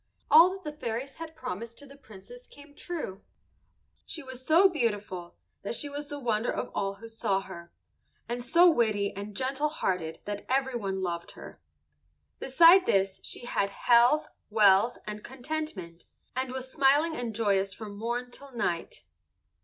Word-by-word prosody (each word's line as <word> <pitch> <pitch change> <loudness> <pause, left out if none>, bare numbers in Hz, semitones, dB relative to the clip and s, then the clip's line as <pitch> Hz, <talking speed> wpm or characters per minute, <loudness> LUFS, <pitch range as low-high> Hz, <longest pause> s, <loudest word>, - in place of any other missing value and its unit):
All 335 +3 +9
that 380 - -19
the 300 - -5
fairies 260 -1 -4
had 325 -1 -8
promised 230 -1 -6
to 285 - -12
the 280 0 -14
Princess 280 - -14
came 285 0 -16
true. 290 - -6 0.9
She 325 - -4
was 260 -1 -9
so 330 +8 +6
beautiful 205 - -3 0.3
that 200 - -4
she 290 - -2
was 290 +1 -6
the 290 - -6
wonder 235 -4 0
of - - -4
all 195 0 -2
who 225 +3 -11
saw 225 -3 -1
her, 170 -3 -10 0.6
and 240 +1 -3
so 335 +8 +5
witty 215 - +2
and 200 +1 -7
gentle 270 +3 0
hearted 180 - -2
that 205 0 -5
everyone 240 -8 -1
loved 170 -1 -4
her. - - -12 0.8
Beside 335 +7 +6
this 195 -1 +1
she - - -6
had 200 -4 0
health, 240 +7 +4 0.2
wealth, 210 +1 +4
and 210 0 -6
contentment, 260 - -6 0.3
and 260 0 -2
was 260 0 -6
smiling 295 +3 +3
and 235 -5 -4
joyous 200 -3 +1
from 205 +1 -8
morn 240 +3 -3
till 280 +2 -12
night. 175 - -3
240 Hz, 160 wpm, -28 LUFS, 200-285 Hz, 0.9 s, All